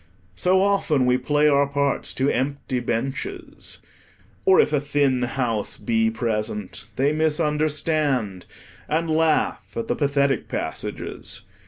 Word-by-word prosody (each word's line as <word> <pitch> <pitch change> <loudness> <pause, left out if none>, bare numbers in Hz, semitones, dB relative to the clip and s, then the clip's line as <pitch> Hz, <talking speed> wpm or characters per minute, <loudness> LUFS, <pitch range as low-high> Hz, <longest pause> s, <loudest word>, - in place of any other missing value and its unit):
So 185 +1 +3
often 185 -9 +2
we 125 0 +3
play 145 +3 +2
our 140 -1 +4
parts 140 0 0
to 130 - +1
empty 135 -1 -1
benches, 280 - -4 0.6
or 385 -1 +6
if - - +3
a 145 - +2
thin 145 -3 +1
house 120 -4 -1
be 110 +1 +1
present, 110 -3 -3
they 140 +3 +2
misunderstand, 150 - 0 0.4
and 160 +1 0
laugh 160 0 +1
at 230 -1 -3
the - - 0
pathetic 140 -3 +1
passages. - - -4
140 Hz, 125 wpm, -23 LUFS, 125-155 Hz, 0.6 s, or